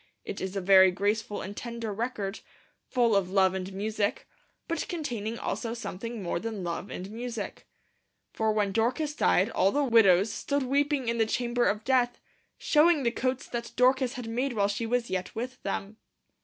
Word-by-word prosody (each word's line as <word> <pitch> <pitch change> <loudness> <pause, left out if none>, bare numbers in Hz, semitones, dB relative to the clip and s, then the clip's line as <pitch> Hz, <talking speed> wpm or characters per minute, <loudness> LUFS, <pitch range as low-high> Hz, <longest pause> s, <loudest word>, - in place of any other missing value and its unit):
It - - -5
is 190 +1 -4
a 195 - -1
very 190 0 +7
graceful 205 +3 -1
and 200 +2 -7
tender 235 -2 -5
record, 215 -2 -3 0.5
full 235 -4 +3
of 195 -2 +2
Love 190 -1 +3
and 190 0 -4
Music, 205 +1 -2 0.4
but 330 -2 -2
containing 235 - -3
also 225 +3 -3
something 230 0 -6
more 170 -1 -1
than 215 -1 -5
Love 170 +3 -4
and 190 +3 -6
Music. 230 -1 -6 0.7
For 220 -1 +1
when 210 -2 +1
Dorcas 250 +8 0
died 210 -7 +2
all 195 - +3
the 290 +4 +1
widows 220 -5 +5
stood 285 -1 -1
weeping 280 0 +1
in 235 0 0
the 225 - +3
chamber 240 +1 0
of 210 +1 0
death, 245 -1 +2 0.4
showing 305 -1 +4
the 235 - +2
coats 255 +1 -2
that 235 -1 -5
Dorcas 255 0 +3
had 250 -3 -6
made 245 +4 -1
while 200 -3 +2
she 205 +3 -2
was 240 0 0
yet 185 -1 -3
with 250 +3 -5
them. 200 +2 -4
225 Hz, 180 wpm, -28 LUFS, 200-250 Hz, 0.7 s, very